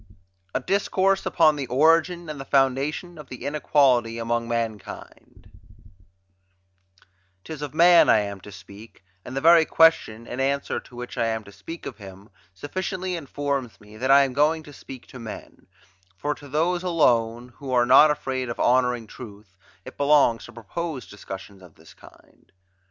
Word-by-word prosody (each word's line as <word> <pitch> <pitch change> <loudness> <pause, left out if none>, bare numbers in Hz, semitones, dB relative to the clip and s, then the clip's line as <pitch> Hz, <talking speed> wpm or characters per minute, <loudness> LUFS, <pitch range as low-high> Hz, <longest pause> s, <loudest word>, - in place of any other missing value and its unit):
A - - +2
DISCOURSE 195 +4 0
UPON 155 -3 +3
THE 135 -2 -4
ORIGIN 165 +6 +2
AND 150 -3 -6
THE - - -8
FOUNDATION 140 +5 0
OF 150 - -12
THE 125 - -9
INEQUALITY 135 -5 +2
AMONG 115 0 -2
MANKIND 115 -3 -6 1.9
'Tis 155 -2 -8
of 145 0 -6
man 170 +1 +6
I - - +6
am 100 -2 -6
to 105 - -12
speak; 100 +1 -14 0.2
and 130 - -7
the - - -1
very 165 +1 +6
question, 160 -9 +2
in 125 - -7
answer 140 +1 -1
to 125 - -17
which 125 0 -7
I 115 - +1
am 110 -1 -2
to 100 - -14
speak 165 +10 -10
of - - -8
him, 95 +1 -12 0.2
sufficiently 185 - -4
informs 140 -5 -4
me 105 0 -16
that 130 +4 -3
I 140 +1 +7
am 135 -2 -3
going 155 +3 +1
to 145 - -13
speak 130 -2 -11
to 130 - -11
men; 115 -2 -10 0.5
for 145 +6 -2
to 145 - -14
those 170 +5 0
alone, 120 -9 +1
who 140 -3 -7
are 120 -1 +3
not 135 +5 +7
afraid 130 -4 -3
of 120 - -6
honouring 125 -2 +2
truth, 105 -4 -13 0.3
it - - -11
belongs 140 -5 +3
to - - -12
propose 130 - -6
discussions 95 -1 -10
of 90 -4 -17
this 80 +1 -18
kind. - - -21
130 Hz, 170 wpm, -24 LUFS, 115-155 Hz, 1.9 s, I